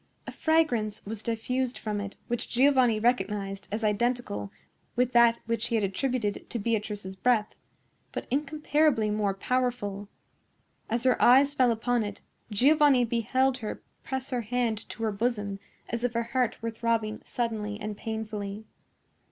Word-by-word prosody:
A -, -, -6 dB
fragrance 245 Hz, -10 st, +1 dB
was 215 Hz, +1 st, -5 dB
diffused 245 Hz, +3 st, -1 dB
from 210 Hz, -2 st, -3 dB
it 200 Hz, 0 st, -7 dB
which 235 Hz, 0 st, -2 dB
Giovanni 255 Hz, -3 st, +4 dB
recognized 210 Hz, -4 st, 0 dB
as 215 Hz, +2 st, -2 dB
identical 210 Hz, -, 0 dB, 0.4 s
with 250 Hz, 0 st, +2 dB
that 235 Hz, -1 st, +6 dB
which 230 Hz, +1 st, -1 dB
he 235 Hz, -, -1 dB
had 220 Hz, -, +2 dB
attributed 210 Hz, +2 st, -1 dB
to -, -, -3 dB
Beatrice's 210 Hz, -3 st, -2 dB
breath, 215 Hz, +1 st, +2 dB, 0.6 s
but -, -, -4 dB
incomparably 295 Hz, -4 st, +2 dB
more 205 Hz, -2 st, 0 dB
powerful. 205 Hz, -4 st, -1 dB, 0.8 s
As 235 Hz, +1 st, 0 dB
her 255 Hz, -1 st, +3 dB
eyes 275 Hz, +3 st, +6 dB
fell 255 Hz, -3 st, +4 dB
upon 235 Hz, +1 st, +1 dB
it, 205 Hz, -2 st, -5 dB, 0.3 s
Giovanni 270 Hz, +3 st, +5 dB
beheld 255 Hz, +3 st, +1 dB
her 215 Hz, -3 st, -5 dB, 0.2 s
press 265 Hz, 0 st, -4 dB
her 250 Hz, -1 st, 0 dB
hand 230 Hz, -1 st, -1 dB
to 225 Hz, -, -6 dB
her 220 Hz, -, +1 dB
bosom 205 Hz, -2 st, -1 dB, 0.3 s
as 235 Hz, 0 st, -3 dB
if 245 Hz, -1 st, 0 dB
her 235 Hz, 0 st, 0 dB
heart 250 Hz, -3 st, +1 dB
were 230 Hz, -, -1 dB
throbbing 225 Hz, -2 st, -1 dB
suddenly 215 Hz, -3 st, -3 dB
and 210 Hz, 0 st, -4 dB
painfully. 215 Hz, -1 st, -5 dB
230 Hz, 150 wpm, -28 LUFS, 210-250 Hz, 0.8 s, that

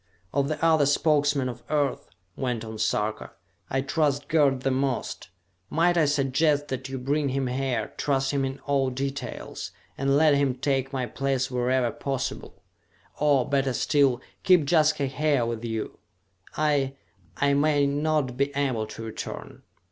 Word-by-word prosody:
"Of 140 Hz, 0 st, +1 dB
the 155 Hz, +1 st, -1 dB
other 160 Hz, -3 st, +4 dB
Spokesmen 145 Hz, -2 st, +2 dB
of 125 Hz, -, -6 dB
Earth," 145 Hz, -3 st, 0 dB, 0.3 s
went 120 Hz, -4 st, -2 dB
on 110 Hz, -1 st, -7 dB
Sarka, 105 Hz, 0 st, -1 dB, 0.4 s
"I 135 Hz, -, 0 dB
trust 145 Hz, 0 st, 0 dB
Gerd 140 Hz, -5 st, +3 dB
the 135 Hz, -, 0 dB
most. 130 Hz, -7 st, -2 dB, 0.4 s
Might 175 Hz, +2 st, +2 dB
I 165 Hz, -3 st, +4 dB
suggest 145 Hz, +1 st, +1 dB
that 130 Hz, 0 st, -4 dB
you 135 Hz, -, -4 dB
bring 140 Hz, +3 st, 0 dB
him 135 Hz, 0 st, -1 dB
here, 125 Hz, -3 st, -2 dB
trust 135 Hz, -2 st, 0 dB
him 140 Hz, -1 st, 0 dB
in 135 Hz, 0 st, -3 dB
all 140 Hz, -2 st, +1 dB
details, 135 Hz, +2 st, -5 dB, 0.3 s
and 135 Hz, +1 st, +2 dB
let 155 Hz, -1 st, +5 dB
him 140 Hz, -2 st, +2 dB
take 135 Hz, 0 st, -1 dB
my 130 Hz, -2 st, -1 dB
place 130 Hz, +2 st, -1 dB
wherever 125 Hz, -1 st, +1 dB
possible? 135 Hz, +2 st, -4 dB, 0.6 s
Or, 145 Hz, -4 st, +3 dB
better 135 Hz, -2 st, +1 dB
still, 135 Hz, -1 st, +2 dB, 0.2 s
keep 180 Hz, -6 st, +4 dB
Jaska 155 Hz, -2 st, +3 dB
here 140 Hz, -1 st, +1 dB
with 115 Hz, -1 st, -4 dB
you! 110 Hz, -2 st, -4 dB, 0.6 s
I... 145 Hz, -3 st, +1 dB, 0.4 s
I 140 Hz, 0 st, +2 dB
may 145 Hz, 0 st, +3 dB
not 145 Hz, -2 st, 0 dB
be 140 Hz, +1 st, +1 dB
able 130 Hz, -6 st, 0 dB
to 115 Hz, -, -8 dB
return! 110 Hz, -1 st, -7 dB
135 Hz, 155 wpm, -26 LUFS, 130-145 Hz, 0.6 s, let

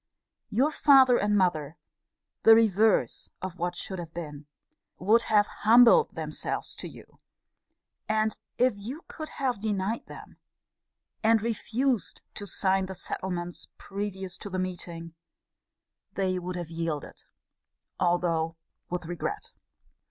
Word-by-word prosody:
Your 265 Hz, +8 st, +2 dB
father 270 Hz, -4 st, +6 dB
and 205 Hz, 0 st, +2 dB
mother 160 Hz, -5 st, 0 dB, 0.6 s
(the 225 Hz, -, +8 dB
reverse 220 Hz, -, +2 dB
of 185 Hz, -1 st, -6 dB
what 175 Hz, +1 st, -1 dB
should 190 Hz, +1 st, -5 dB
have 165 Hz, -1 st, -8 dB
been!) 150 Hz, -4 st, -7 dB, 0.5 s
would 215 Hz, +6 st, +4 dB
have 210 Hz, -1 st, +5 dB, 0.2 s
humbled 245 Hz, -, +6 dB
themselves -, -, -4 dB
to -, -, -6 dB
you: -, -, -15 dB, 0.9 s
and 215 Hz, 0 st, +1 dB, 0.2 s
if 250 Hz, 0 st, +4 dB
you 240 Hz, +11 st, -7 dB
could 310 Hz, -1 st, -7 dB
have 255 Hz, -7 st, -2 dB
denied 210 Hz, 0 st, -2 dB
them, -, -, -12 dB, 0.8 s
and 220 Hz, -1 st, +4 dB
refused 235 Hz, +1 st, -1 dB
to 205 Hz, -, -6 dB
sign 190 Hz, 0 st, +1 dB
the 190 Hz, -, -6 dB
settlements 175 Hz, -1 st, -4 dB
previous 195 Hz, -2 st, -5 dB
to 205 Hz, -, -7 dB
the 185 Hz, -, -3 dB
meeting, 175 Hz, -2 st, -5 dB, 1.0 s
they 185 Hz, -2 st, 0 dB
would 180 Hz, 0 st, -5 dB
have 175 Hz, -2 st, -5 dB
yielded, 165 Hz, -3 st, -4 dB, 0.7 s
although 170 Hz, -2 st, +1 dB, 0.3 s
with 180 Hz, -1 st, -3 dB
regret. 175 Hz, -, -4 dB
190 Hz, 120 wpm, -28 LUFS, 175-225 Hz, 1.0 s, the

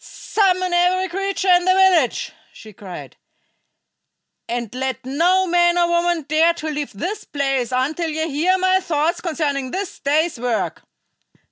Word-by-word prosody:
"Summon 370 Hz, -3 st, 0 dB
every 360 Hz, +2 st, +2 dB
creature 390 Hz, +1 st, -2 dB
in 355 Hz, 0 st, +5 dB
the 370 Hz, 0 st, +4 dB
village," 370 Hz, -9 st, +3 dB, 0.2 s
she 215 Hz, -1 st, -13 dB
cried, 190 Hz, -2 st, -10 dB, 1.3 s
"and 235 Hz, -2 st, -4 dB
let 260 Hz, 0 st, -4 dB
no 350 Hz, +8 st, +2 dB
man 345 Hz, 0 st, +3 dB
or 345 Hz, -1 st, +3 dB
woman 345 Hz, -1 st, +1 dB
dare 315 Hz, +4 st, +2 dB
to 315 Hz, -2 st, -4 dB
leave 295 Hz, -3 st, -4 dB
this 360 Hz, -, -4 dB
place 270 Hz, -3 st, -2 dB
until 295 Hz, +6 st, -1 dB
ye 315 Hz, +1 st, -2 dB
hear 330 Hz, +6 st, +1 dB
my 375 Hz, 0 st, +2 dB
thoughts 335 Hz, -2 st, -1 dB
concerning 290 Hz, -6 st, -2 dB
this 390 Hz, +6 st, -5 dB
day's 300 Hz, 0 st, 0 dB
work!" 240 Hz, -2 st, -2 dB
335 Hz, 145 wpm, -20 LUFS, 275-365 Hz, 1.3 s, in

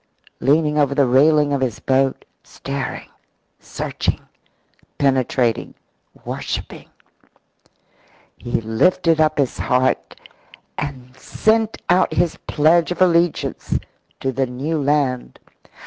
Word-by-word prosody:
Leaning 150 Hz, +1 st, +2 dB
over 140 Hz, -1 st, +2 dB
the 140 Hz, -1 st, +4 dB
railing 145 Hz, +3 st, +4 dB
of 140 Hz, -, -1 dB
his 125 Hz, -4 st, -1 dB
boat, 135 Hz, 0 st, 0 dB, 0.2 s
staring, 140 Hz, -1 st, -6 dB, 0.5 s
searching, -, -, -3 dB, 0.8 s
penetrating, 130 Hz, -4 st, 0 dB, 0.5 s
worshipping, -, -, -5 dB, 1.5 s
he 120 Hz, -1 st, -3 dB
lifted 160 Hz, +9 st, +2 dB
up 155 Hz, 0 st, +2 dB
his 140 Hz, -3 st, 0 dB
heart 125 Hz, 0 st, 0 dB, 0.6 s
and 130 Hz, -3 st, -6 dB
sent 220 Hz, +10 st, 0 dB
out 180 Hz, +1 st, +3 dB
his 170 Hz, -, 0 dB
pledge 160 Hz, +3 st, +3 dB
of 180 Hz, -, -4 dB
allegiance 175 Hz, -2 st, +1 dB, 0.4 s
to 135 Hz, -, -1 dB
the 135 Hz, +1 st, -1 dB
new 145 Hz, +6 st, -3 dB
land. 140 Hz, -3 st, 0 dB
140 Hz, 100 wpm, -20 LUFS, 130-160 Hz, 1.5 s, the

